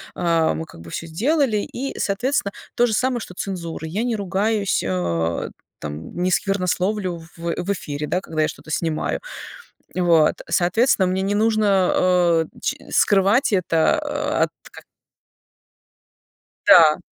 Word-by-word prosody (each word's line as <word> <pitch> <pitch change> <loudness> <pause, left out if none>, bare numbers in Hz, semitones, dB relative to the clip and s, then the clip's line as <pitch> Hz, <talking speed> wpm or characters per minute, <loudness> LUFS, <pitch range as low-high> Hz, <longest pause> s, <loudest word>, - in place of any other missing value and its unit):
а, 165 -2 +2
мы 160 - -4
как 85 - -14
бы 85 - -11
всё 165 - -5
сделали. 245 - +1
И, 255 +6 -4
соответственно, 205 +1 -1 0.2
то 240 0 +3
же 220 - -1
самое, 250 +3 +1
что 180 -5 -9
цензура. 170 -4 -5
Я 190 +7 -2
не 240 -2 0
ругаюсь, 200 +1 0
а, 85 -2 -1 0.3
там, 75 +2 -7
не 180 - +2
сквернословлю 185 -1 0 0.2
в 170 0 -2
в 195 - -1
эфире, 150 -5 -5
да, 180 - 0
когда 160 -4 -3
я - - +2
что-то - - -11
снимаю, 160 0 -1 0.8
вот. 170 -4 +4 0.2
Соответственно, 190 +3 +3
мне 185 +1 -1
не 200 +1 0
нужно, 215 0 +2 0.3
а, 175 -3 +3 0.2
ч - - -1
скрывать 205 +7 +3
это 170 -4 +2 0.5
от - - -5 0.2
ка - - -13 1.8
Да. 155 -2 +7
185 Hz, 140 wpm, -22 LUFS, 160-210 Hz, 1.8 s, Да